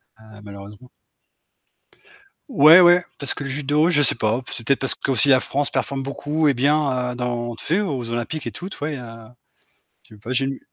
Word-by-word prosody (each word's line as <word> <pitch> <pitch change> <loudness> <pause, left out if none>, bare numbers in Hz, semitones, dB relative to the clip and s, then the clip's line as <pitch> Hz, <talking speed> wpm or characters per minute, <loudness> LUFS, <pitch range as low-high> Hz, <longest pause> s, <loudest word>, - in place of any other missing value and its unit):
Ah, 110 -1 -17
malheureusement. 100 +4 -12 1.6
Ouais, 165 - +7
ouais 175 0 +5
parce 140 - 0
que - - -7
le 140 - -6
judo, 150 +4 0
je 145 -4 +3
sais - - +4
pas, 110 +2 -1
c'est 115 - -6
peut-être 140 - +2
parce 135 - 0
qu'aussi 135 0 +1
la 130 -2 +6
France 145 +2 -2
performe 135 +1 -3
beaucoup 145 +3 -2
et 140 - +3
bien, 130 -2 0
heu, - - -7
dans 120 -1 -4
tu - - -10
sais, 180 +6 +1
aux 135 - -4
olympiques 120 +6 -4
et - - -4
tout, 185 +2 -8
tu - - -10
vois? 145 - -4
Il 150 - -5
y - - -7
a 115 -1 -12 0.7
je - - -15
sais 105 - -19
pas, 120 +4 -6
j'ai 135 +1 0
une 135 0 -5
135 Hz, 220 wpm, -21 LUFS, 120-150 Hz, 1.6 s, Ouais